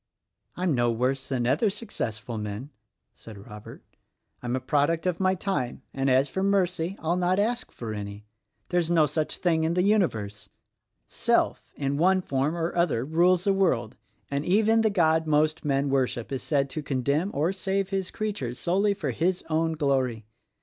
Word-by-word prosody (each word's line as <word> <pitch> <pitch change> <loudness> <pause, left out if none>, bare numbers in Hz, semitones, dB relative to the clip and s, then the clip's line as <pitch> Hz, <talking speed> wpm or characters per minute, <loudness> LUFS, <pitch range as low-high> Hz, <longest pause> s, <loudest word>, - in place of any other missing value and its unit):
"I'm 180 -3 +1
no 120 -2 +2
worse 130 +3 -1
than 125 -3 0
other 145 - +2
successful 120 - -5
men," 105 +7 -5 0.4
said 110 -2 -12
Rob 105 +2 -11
ert. 115 - -11 0.6
"I'm 125 0 -2
a - - 0
product 145 +5 +1
of 180 -2 0
my 185 0 +2
time; 155 -10 -3
and 135 0 0
as 130 +2 +4
for 190 - -3
Mercy, 185 -2 +1
I'll 165 +2 -1
not 180 +1 +1
ask 235 +4 -1
for 115 -2 -6
any. 100 0 -7 0.4
There's 175 -2 +1
no 165 -3 +4
such 155 0 -2
thing 165 -3 +1
in 165 +2 0
the 180 - +2
universe. 110 - 0 0.6
Self, - - +1
in 140 0 -1
one 185 +3 +3
form 140 +4 -1
or 165 0 -2
other, 165 -9 +1
rules 175 +4 +3
the 195 - +3
world; 130 - +1 0.4
and 140 +1 -1
even 220 +6 +3
the 220 - +3
God 160 -5 +2
most 155 +1 +2
men 140 -1 +1
worship 130 -3 -1
is 135 - -2
said 140 -2 +1
to 155 - -3
condemn 140 +6 0
or 160 +6 0
save 195 0 -2
his 190 -1 -1
creatures 195 - -4
solely 200 +4 +1
for 150 -9 -2
His 175 +8 0
own 160 +1 +1
glory. 130 -7 0
155 Hz, 175 wpm, -26 LUFS, 130-185 Hz, 0.6 s, as